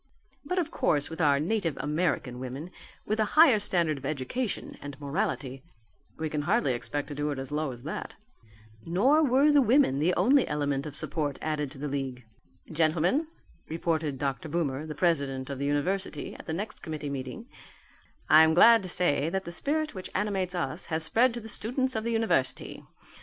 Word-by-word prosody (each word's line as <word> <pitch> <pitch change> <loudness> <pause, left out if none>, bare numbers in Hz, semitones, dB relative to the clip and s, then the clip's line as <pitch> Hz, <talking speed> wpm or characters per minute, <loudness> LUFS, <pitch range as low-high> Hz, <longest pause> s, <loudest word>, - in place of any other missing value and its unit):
But 365 - -2
of 330 -3 0
course 145 -1 +1
with 160 - -4
our 140 -2 +4
native 170 -2 -1
American 150 -5 -1
women, 130 +7 -6 0.3
with 215 +1 -1
a - - +4
higher 305 -9 +7
standard 170 -7 +1
of 135 - -10
education 155 - -3
and 145 -1 -8
morality, 140 -2 -3 0.6
we 160 - -2
can 150 -1 -2
hardly 170 - +1
expect 145 +4 -3
to - - -5
do 145 +1 -2
it 145 - -3
as 135 0 -6
low 150 -1 -1
as 120 -1 -11
that." 155 - -6 0.7
Nor 245 - +3
were 280 +2 +4
the 290 -1 +5
women 245 - +3
the 175 +4 +2
only 255 +8 +4
element 145 -1 -1
of 145 - -8
support 150 -3 -2
added 150 -2 -2
to 135 - -13
the 145 +2 -4
league. 135 -3 -4 0.5
"Gentlemen," 165 - +1 0.4
reported 160 -3 -1
Dr. 140 +4 -3
Boomer, 150 -2 -2
the 155 - -6
president 140 -6 0
of 135 - -5
the 140 - -2
university, 145 +3 -2
at - - -12
the - - -3
next 210 +6 -5
committee 155 -2 -5
meeting, 135 - -6 0.8
"I 155 - +8
am 160 0 +4
glad 230 +5 +7
to 185 - -6
say 155 -4 +1
that 190 +2 -3
the 170 - -6
spirit 305 - -1
which 185 -1 -7
animates 190 -3 -1
us 165 0 -3
has 160 -1 0
spread 235 +10 +3
to - - -4
the 220 - -10
students 255 +4 +1
of 220 - -1
the 235 - -1
university. 225 - -1
160 Hz, 190 wpm, -28 LUFS, 145-205 Hz, 0.8 s, I